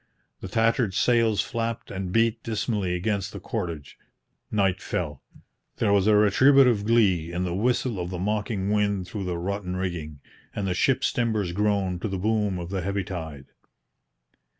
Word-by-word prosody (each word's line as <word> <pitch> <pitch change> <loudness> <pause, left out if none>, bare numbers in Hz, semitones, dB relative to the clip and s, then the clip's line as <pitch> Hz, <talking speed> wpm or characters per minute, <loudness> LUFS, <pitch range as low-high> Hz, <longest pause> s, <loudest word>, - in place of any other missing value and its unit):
The - - -7
tattered 115 -1 +1
sails 115 -4 +3
flapped 115 0 -4
and 95 -1 -4
beat 115 +2 +2
dismally 105 -5 -1
against 100 +1 -1
the - - -6
cordage. 85 - -5 0.5
Night 95 -3 +1
fell. 75 -6 -3 0.5
There 100 - +1
was 100 0 +3
a 110 - +5
retributive 120 +2 +5
glee 95 -8 +3
in 90 +1 -2
the 90 -1 -2
whistle 120 +1 0
of 90 0 -3
the 90 - -4
mocking 105 +1 -1
wind 100 -3 0
through 100 -1 -5
the 90 -1 -2
rotten 95 +1 -3
rigging, 85 -6 -4 0.4
and 100 - -2
the 90 - 0
ship's 130 +8 +1
timbers 110 -6 0
groaned 100 -2 0
to - - -1
the 95 -2 -3
boom 105 -1 0
of 85 +1 -6
the 95 -1 -1
heavy 100 +2 -2
tide. 80 -7 -7
100 Hz, 165 wpm, -25 LUFS, 90-110 Hz, 0.5 s, a